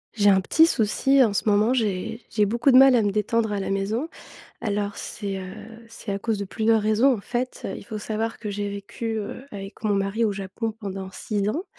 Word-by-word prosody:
J'ai 205 Hz, -1 st, +4 dB
un 190 Hz, -1 st, +5 dB
petit 320 Hz, -, +5 dB
souci 265 Hz, +2 st, +3 dB
en 220 Hz, -4 st, +1 dB
ce 205 Hz, -, +1 dB
moment, 210 Hz, +4 st, +3 dB
j'ai 225 Hz, -1 st, -1 dB
j'ai 210 Hz, -2 st, +2 dB
beaucoup 235 Hz, +6 st, +1 dB
de 255 Hz, -, +7 dB
mal 270 Hz, 0 st, +8 dB
à 235 Hz, -, +4 dB
me 205 Hz, -, +1 dB
détendre 215 Hz, +2 st, 0 dB
à 205 Hz, -, -1 dB
la 195 Hz, -, -3 dB
maison. 210 Hz, +10 st, -1 dB, 0.5 s
Alors 205 Hz, -2 st, -2 dB
c'est, 200 Hz, -2 st, -5 dB
heu, 185 Hz, 0 st, -7 dB, 0.3 s
c'est 225 Hz, -2 st, -7 dB
à 195 Hz, -, -2 dB
cause 220 Hz, 0 st, -1 dB
de 200 Hz, -, -4 dB
plusieurs 220 Hz, +2 st, +2 dB
raisons 215 Hz, +6 st, +3 dB
en 230 Hz, -, -2 dB
fait, 245 Hz, +4 st, -3 dB
heu, 195 Hz, -, -4 dB
il -, -, -10 dB
faut 215 Hz, 0 st, -6 dB
savoir 220 Hz, +2 st, -3 dB
que 215 Hz, -, -6 dB
j'ai 205 Hz, 0 st, -3 dB
vécu, 200 Hz, +3 st, -5 dB
heu, 230 Hz, +5 st, -6 dB
avec 195 Hz, 0 st, -9 dB
mon 210 Hz, -, +2 dB
mari 195 Hz, +3 st, 0 dB
au 215 Hz, -, +1 dB
Japon 200 Hz, +3 st, -4 dB
pendant 195 Hz, -2 st, -5 dB
6 205 Hz, -2 st, -2 dB
ans 325 Hz, -, -3 dB
210 Hz, 230 wpm, -24 LUFS, 200-230 Hz, 0.5 s, mal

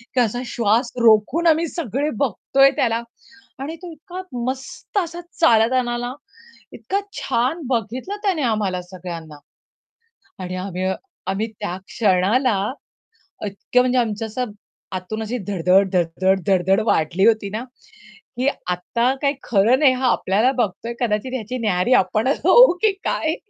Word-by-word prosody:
की -, -, +3 dB
असा 240 Hz, +1 st, 0 dB
श्वास 235 Hz, +2 st, +1 dB
रोखून 235 Hz, +10 st, +4 dB
आम्ही 325 Hz, +1 st, +3 dB
सगळे 290 Hz, -, -2 dB
बघतोय 275 Hz, +2 st, +3 dB
त्याला 230 Hz, -1 st, +1 dB, 0.6 s
आणि 300 Hz, +4 st, -5 dB
तो 350 Hz, -2 st, -8 dB
इतका 365 Hz, +3 st, -8 dB, 0.2 s
मस्त 265 Hz, +9 st, -5 dB
असा 345 Hz, -1 st, -4 dB, 0.2 s
चालत 230 Hz, -5 st, +5 dB
आला 240 Hz, -2 st, +1 dB
ना, 245 Hz, +1 st, -4 dB, 0.6 s
इतका 395 Hz, +1 st, -2 dB, 0.2 s
छान 265 Hz, +6 st, 0 dB
बघितलं 250 Hz, -, -2 dB
त्याने 370 Hz, -7 st, +1 dB
आम्हाला 205 Hz, -6 st, 0 dB
सगळ्यांना 170 Hz, -4 st, -9 dB, 1.1 s
आणि 180 Hz, 0 st, -5 dB
आम्ही 185 Hz, 0 st, -4 dB, 0.4 s
आम्ही 200 Hz, +4 st, -1 dB
त्या 180 Hz, -, -3 dB
क्षणाला 210 Hz, +2 st, +2 dB, 0.9 s
इतक्या 205 Hz, +5 st, +1 dB
म्हणजे 255 Hz, 0 st, +1 dB
आमचं 220 Hz, -1 st, -1 dB
असं 235 Hz, +1 st, -4 dB, 0.4 s
आतून 200 Hz, +4 st, -4 dB
अशी 240 Hz, +3 st, -3 dB
धड-धड, 195 Hz, -1 st, +2 dB
धड, 175 Hz, -2 st, +3 dB, 0.2 s
धड, 190 Hz, +1 st, +3 dB
धड, 190 Hz, -2 st, +3 dB
धड 195 Hz, +2 st, +4 dB
वाढली 170 Hz, +2 st, +2 dB
होती 215 Hz, -3 st, +2 dB
ना 220 Hz, +4 st, -4 dB, 0.7 s
की 260 Hz, +2 st, 0 dB, 0.2 s
आत्ता 235 Hz, +8 st, 0 dB
काही 280 Hz, -1 st, +2 dB
खरं 230 Hz, +5 st, +3 dB
नाही 275 Hz, -4 st, +5 dB
हा 255 Hz, 0 st, 0 dB
आपल्याला 215 Hz, +7 st, +2 dB
बघतोय 230 Hz, +1 st, -2 dB
कदाचित 230 Hz, +1 st, -1 dB
ह्याची 255 Hz, 0 st, -4 dB
न्याहारी 205 Hz, +2 st, +1 dB
आपणच 215 Hz, +6 st, +2 dB
होऊ 485 Hz, +2 st, +8 dB
की 435 Hz, -2 st, +4 dB
काय? 315 Hz, +1 st, 0 dB
230 Hz, 145 wpm, -21 LUFS, 195-260 Hz, 1.1 s, होऊ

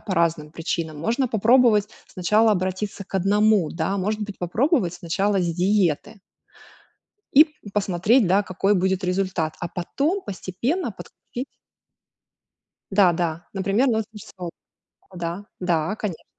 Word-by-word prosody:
по 190 Hz, -, -3 dB
разным 160 Hz, -3 st, +1 dB
причинам, 160 Hz, -1 st, -3 dB
можно 235 Hz, -, 0 dB
попробовать 220 Hz, -1 st, +4 dB, 0.2 s
сначала 215 Hz, +5 st, +2 dB
обратиться 190 Hz, +2 st, -3 dB
к 195 Hz, -, -17 dB
одному, 200 Hz, -1 st, +3 dB
да. 170 Hz, +4 st, -2 dB
Может 210 Hz, +3 st, -1 dB
быть, 205 Hz, -1 st, -7 dB
попробовать 195 Hz, -, +1 dB
сначала 195 Hz, +4 st, 0 dB
с 175 Hz, -, 0 dB
диеты 195 Hz, +2 st, +1 dB, 1.1 s
и 300 Hz, +3 st, +9 dB, 0.3 s
посмотреть, 205 Hz, +3 st, +2 dB
да, 195 Hz, +3 st, +3 dB
какой 195 Hz, +1 st, 0 dB
будет 190 Hz, 0 st, +1 dB
результат, 180 Hz, -4 st, -1 dB
а 175 Hz, -, -3 dB
потом 290 Hz, -, -2 dB
постепенно 205 Hz, -, -3 dB
подключить 250 Hz, +2 st, -8 dB, 1.5 s
Да-да, 175 Hz, -4 st, +2 dB
например, 200 Hz, +7 st, +1 dB
нутрициолог. 215 Hz, -6 st, -4 dB, 0.6 s
Да, 175 Hz, +3 st, -4 dB, 0.2 s
да, 175 Hz, +1 st, 0 dB
конечно. 205 Hz, -7 st, -5 dB
195 Hz, 115 wpm, -23 LUFS, 175-215 Hz, 1.5 s, и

